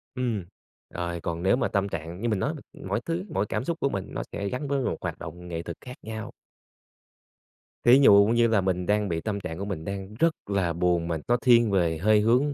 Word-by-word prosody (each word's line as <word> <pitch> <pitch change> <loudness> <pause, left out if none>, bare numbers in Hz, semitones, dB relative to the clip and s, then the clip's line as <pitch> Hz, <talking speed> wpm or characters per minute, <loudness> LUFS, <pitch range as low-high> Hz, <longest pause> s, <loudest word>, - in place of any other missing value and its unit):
Ừm, 115 -8 -1 0.4
rồi 85 -1 -4
còn 85 +1 -3
nếu 95 - +4
mà 130 - 0
tâm 100 -1 0
trạng 85 +3 -6
như 120 - 0
mình 105 -3 0
nói 150 - 0
mà, 150 - -9 0.3
mỗi 100 +3 0
thứ, 170 +3 -2
mỗi 100 +2 0
cảm - - -2
xúc 165 +4 -3
của 140 - +1
mình 95 -5 -3
nó - - -2
sẽ 100 - -3
gắn 135 +5 -3
với 140 -1 0
một - - -1
hoạt - - -4
động 90 +2 -8
nghệ 85 -1 -4
thuật 85 -1 -7
khác 125 0 -9
nhau. 110 0 -6 1.5
Thí 125 +3 +7
dụ 100 -7 +7
như 120 0 +4
là 110 -3 +3
mình 90 -1 -1
đang 105 0 +1
bị 80 -1 -1
tâm 105 0 -2
trạng 85 -4 -6
của 100 - -3
mình 90 -6 -5
đang 100 0 -5
rất 165 +6 +3
là 95 -4 0
buồn 85 -1 +1
mà 85 -1 -1
nó 120 +1 +3
thiên 120 -3 +4
về 85 -4 +2
hơi 105 +5 +4
hướng 125 +7 +3
100 Hz, 240 wpm, -26 LUFS, 90-120 Hz, 1.5 s, Thí